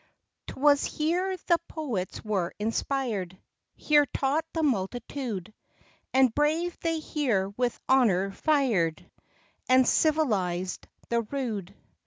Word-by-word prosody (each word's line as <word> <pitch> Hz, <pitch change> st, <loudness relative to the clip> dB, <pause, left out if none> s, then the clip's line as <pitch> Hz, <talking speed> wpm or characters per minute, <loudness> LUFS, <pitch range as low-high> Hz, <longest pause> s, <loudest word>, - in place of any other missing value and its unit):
'T -, -, -7 dB
was 285 Hz, 0 st, +5 dB
here 360 Hz, +5 st, -1 dB
the 340 Hz, -1 st, +3 dB
poets 230 Hz, -, -4 dB
were 190 Hz, -5 st, -1 dB
inspir'd 220 Hz, -4 st, -2 dB, 0.4 s
Here 295 Hz, -1 st, +3 dB
taught 280 Hz, +5 st, 0 dB
the 325 Hz, -, -1 dB
multitude; 230 Hz, -, -2 dB, 0.6 s
And 260 Hz, -3 st, +4 dB
brave 315 Hz, +5 st, +1 dB
they 330 Hz, -1 st, -1 dB
here 255 Hz, -, -1 dB
with 240 Hz, +4 st, -2 dB
honor 200 Hz, -8 st, +3 dB
fir'd 225 Hz, -, +1 dB, 0.6 s
And 255 Hz, 0 st, +5 dB
civilized 195 Hz, -, +1 dB, 0.2 s
the 235 Hz, 0 st, +2 dB
rude. 215 Hz, -6 st, -4 dB
255 Hz, 110 wpm, -27 LUFS, 200-300 Hz, 0.6 s, was